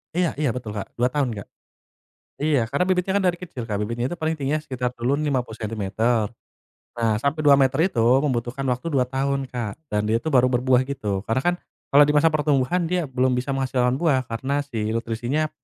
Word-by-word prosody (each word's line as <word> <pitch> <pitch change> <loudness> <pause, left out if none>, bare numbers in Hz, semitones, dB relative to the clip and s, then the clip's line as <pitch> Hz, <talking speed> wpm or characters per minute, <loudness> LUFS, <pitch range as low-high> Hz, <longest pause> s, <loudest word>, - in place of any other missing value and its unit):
Iya, 180 -1 +2
iya 150 -4 +1
betul, 115 -4 -5
Kak. 100 - -7
2 125 +1 +1
tahun, 145 -4 0
Kak. 100 - -8 0.9
Iya, 145 -4 +2
karena 140 +6 +1
bibitnya 185 0 +1
kan 200 - 0
dari 175 -1 +2
kecil, 150 -9 -6
Kak. 105 -3 -2
Bibitnya 115 +3 -2
itu - - -4
paling 160 +1 0
tingginya 145 +2 -1
sekitar 125 -4 -3
dulu 125 +4 0
n 155 - -2
50 125 -5 -2
sentimeter. 110 +1 0 0.7
Nah, 115 -3 +1
sampai 140 +5 -1
2 145 -2 +6
meter 135 0 +2
itu, 115 - -1 0.2
membutuhkan 125 0 -2
waktu 125 +6 -2
2 130 - +4
tahun, 135 +1 -2
Kak. 115 -5 -4 0.2
Dan 105 0 0
dia 110 - +2
itu 160 - -2
baru 130 -3 +5
berbuah 130 +1 +2
gitu. 105 -8 -3
Karena 130 +4 0
kan, 175 +3 +2 0.4
kalau 145 +1 +7
di 150 - +2
masa 150 +2 +5
pertumbuhan, 150 +2 +1
dia 175 -5 -1
belum 130 0 +1
bisa 125 +3 -2
menghasilkan 130 -1 0
buah, 145 -6 +2
karena 135 +5 -1
si 110 -5 -3
nutrisinya 120 +7 -1
130 Hz, 205 wpm, -23 LUFS, 120-145 Hz, 0.9 s, kalau